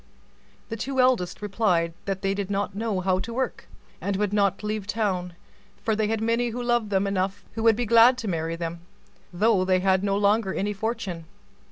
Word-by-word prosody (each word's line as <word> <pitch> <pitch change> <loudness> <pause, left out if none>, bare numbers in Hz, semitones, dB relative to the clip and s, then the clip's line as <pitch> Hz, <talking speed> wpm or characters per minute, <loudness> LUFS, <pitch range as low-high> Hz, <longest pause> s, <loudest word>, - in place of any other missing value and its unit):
The 225 - -3
two 265 +4 -3
eldest 235 -8 +2
replied 185 -5 +1
that 195 -1 -3
they 195 0 +1
did 200 -1 -3
not 200 0 -1
know 205 -2 -2
how 185 0 +1
to 230 +5 -5
work, 260 0 -3 0.3
and 200 0 -1
would 205 0 -1
not 200 -1 +1
leave 210 -1 -3
town; 190 -5 -1 0.5
for 220 - +1
they 215 0 0
had 220 0 -1
lovers 230 -3 0
enough 195 +1 -2
who 225 - -4
would 225 -1 +5
be 240 +2 -1
glad 235 +3 +6
to 230 - -5
marry 165 -2 -2
them, 170 0 -5 0.5
though 200 +1 +2
they 185 0 +2
had 190 0 +2
no 200 -1 +1
longer 205 -1 +2
any 205 +1 -1
fortune. 200 -5 -4
205 Hz, 185 wpm, -25 LUFS, 190-225 Hz, 0.5 s, glad